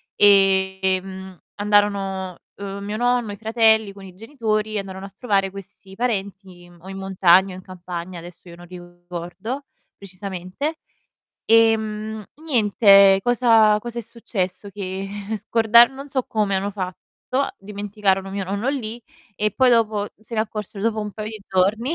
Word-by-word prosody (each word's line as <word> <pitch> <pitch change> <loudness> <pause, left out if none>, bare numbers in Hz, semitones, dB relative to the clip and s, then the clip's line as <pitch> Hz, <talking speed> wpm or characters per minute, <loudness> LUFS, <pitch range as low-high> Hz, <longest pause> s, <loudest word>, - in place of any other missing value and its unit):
ehm, 190 -2 +2 0.2
andarono, 200 -3 0 0.2
uhm, 200 0 -6
mio 205 +1 -4
nonno, 245 -2 +1
i 205 - -7
fratelli 220 -2 +3
con 195 -1 -12
i 185 - -12
genitori, 220 -2 -2
andarono 190 -1 -6
a 195 - -12
trovare 200 -5 +1
questi 195 0 -12
parenti 195 -6 -4
o 185 - -15
in 195 - -7
montagna 190 -1 +3
o - - -8
in 185 - -11
campagna, 180 -1 -7
adesso 175 +1 -13
io 170 - -11
non 175 +1 -13
ricordo 175 +7 -7 0.3
precisamente. 195 - -6 0.7
Ehm, 220 -1 +2 0.2
niente, 200 -7 +5
cosa 225 -3 +4
cosa 240 +1 -6
è - - -3
successo? 210 -4 -4
Che 195 -1 -5 0.3
scordan 230 +3 +5
non 275 +2 -9
so 265 -1 -1
come 205 -3 0
hanno 200 +2 -2
fatto, 200 +8 -4
dimenticarono 200 -1 -2
mio 195 0 -3
nonno 200 +7 -2
lì 240 -4 -3 0.4
e 210 +2 0
poi 260 -1 +4
dopo 215 -3 +2
se 220 +1 -10
ne 215 - +1
accorsero 210 -2 -5
dopo 220 -1 0
un 210 -1 -5
paio 215 0 -5
di 215 -1 -8
giorni, 215 - +1
200 Hz, 150 wpm, -22 LUFS, 190-220 Hz, 0.7 s, niente